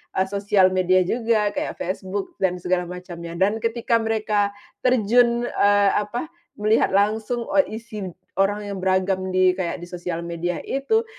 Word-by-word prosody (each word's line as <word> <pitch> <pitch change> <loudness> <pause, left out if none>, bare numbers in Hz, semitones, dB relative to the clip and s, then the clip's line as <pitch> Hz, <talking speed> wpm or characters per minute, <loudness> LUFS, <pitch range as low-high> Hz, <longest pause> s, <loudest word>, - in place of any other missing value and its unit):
eee, 190 0 +1
sosial 200 -2 +3
media 185 0 +3
juga 225 0 +1
kayak - - -3
Facebook 190 +2 -4
dan 185 -2 +1
segala 180 0 -1
macamnya. 175 -2 -8
Dan 200 +5 +1
ketika 230 0 +1
mereka 215 -2 0 0.3
terjun, 240 0 +3
eee, 205 -3 +3
apa, 240 +10 -2 0.2
melihat 215 +2 +3
langsung, 220 +4 +1
eee, 280 -6 +2
isi 215 -4 -7 0.3
orang 205 +2 +2
yang 195 - -5
beragam 190 0 +1
di, 185 0 +4
kayak 180 -1 -4
di - - -8
sosial 175 -1 -4
media 170 +1 -3
itu, 280 - 0
200 Hz, 150 wpm, -23 LUFS, 185-225 Hz, 0.3 s, di